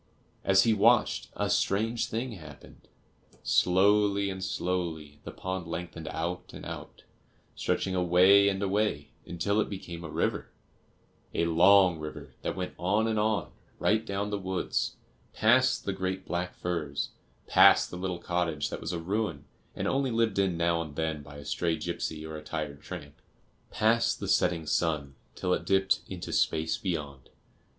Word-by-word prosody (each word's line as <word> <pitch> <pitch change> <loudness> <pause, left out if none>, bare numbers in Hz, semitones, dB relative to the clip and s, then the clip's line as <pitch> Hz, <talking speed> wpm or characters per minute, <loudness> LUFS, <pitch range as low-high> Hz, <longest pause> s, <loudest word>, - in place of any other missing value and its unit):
As 95 0 +5
he 115 - +4
watched, 115 +4 +3
a - - 0
strange 110 +4 +1
thing 120 +3 -3
happened. 80 -9 -12 0.6
Slowly 100 +2 +3
and 95 0 -6
slowly 85 -6 -3
the - - -5
pond 95 -2 -5
lengthened 85 -1 -6
out 85 +2 -4
and - - -9
out, - - -8 0.5
stretching 95 - -1
away 95 +3 +5
and 95 0 -2
away 100 -7 0 0.2
until 100 +5 0
it - - -2
became 85 -4 -7
a 80 - -6
river - - -1 0.9
a 85 - +2
long 90 +1 +5
river 75 -3 -8
that - - -3
went 90 -1 -4
on 105 +5 +1
and 110 -1 0
on, 105 0 0 0.3
right 110 +1 +2
down 100 -1 -3
the 100 - -1
woods, 95 -1 -2 0.4
past 130 +4 +3
the 100 - -1
great 95 0 -3
black 90 +1 -3
firs, 80 -5 -3 0.4
past - - +6
the - - -6
little 90 0 -3
cottage 85 -3 -1
that - - -5
was - - -3
a 85 - -2
ruin 95 +3 -2 0.3
and - - -2
only 135 0 +1
lived 115 -3 +1
in 95 -3 +1
now 85 0 +1
and 75 -3 -7
then 80 -1 -2
by 75 0 -12
a 70 - -10
stray 85 +2 0
gipsy 80 -2 -4
or 80 0 -6
a 75 - -9
tired 75 -2 -5
tramp, 75 -6 -9 0.5
past 115 +2 +2
the - - -4
setting 85 -2 +2
sun, 75 -3 0 0.2
till 90 - 0
it - - -1
dipped 95 0 +2
into 90 -2 -6
space 80 0 +1
beyond. 75 -8 -4
90 Hz, 160 wpm, -29 LUFS, 80-100 Hz, 0.9 s, past